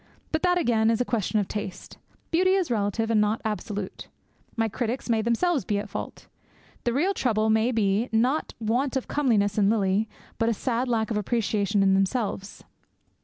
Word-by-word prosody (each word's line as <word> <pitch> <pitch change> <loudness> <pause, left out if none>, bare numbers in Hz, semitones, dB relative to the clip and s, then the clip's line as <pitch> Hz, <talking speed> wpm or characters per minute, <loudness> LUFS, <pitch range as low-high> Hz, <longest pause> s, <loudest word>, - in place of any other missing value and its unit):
But 315 - 0
that, 360 -1 +3
again, 225 -9 +2
is 230 - +2
all - - +3
a - - -13
question 220 -2 0
of 200 - -1
taste. 200 -3 -6 0.3
Beauty 370 +3 +3
is 370 -8 0
relative 225 +1 0
and 215 -2 +4
not 210 +1 +1
absolute. 205 -2 -4 0.5
My 225 -1 +1
critics 240 +3 -3
may 225 -1 +2
themselves 250 +7 +1
be 205 - -1
at 205 +1 -4
fault. - - -6 0.6
The 240 - +2
real 345 +10 +2
trouble 220 - +1
may 220 +3 +3
be, 220 0 +1
not 250 +7 +1
want 245 +5 0
of 260 - -4
comeliness 215 -8 +1
in 200 -1 +4
Lily, 210 0 +1 0.3
but 225 0 +2
a 230 - 0
sad 250 +3 -1
lack 230 -2 0
of 215 - 0
appreciation 210 -1 +1
in 195 0 +4
themselves. 195 0 -1
225 Hz, 185 wpm, -26 LUFS, 210-250 Hz, 0.6 s, and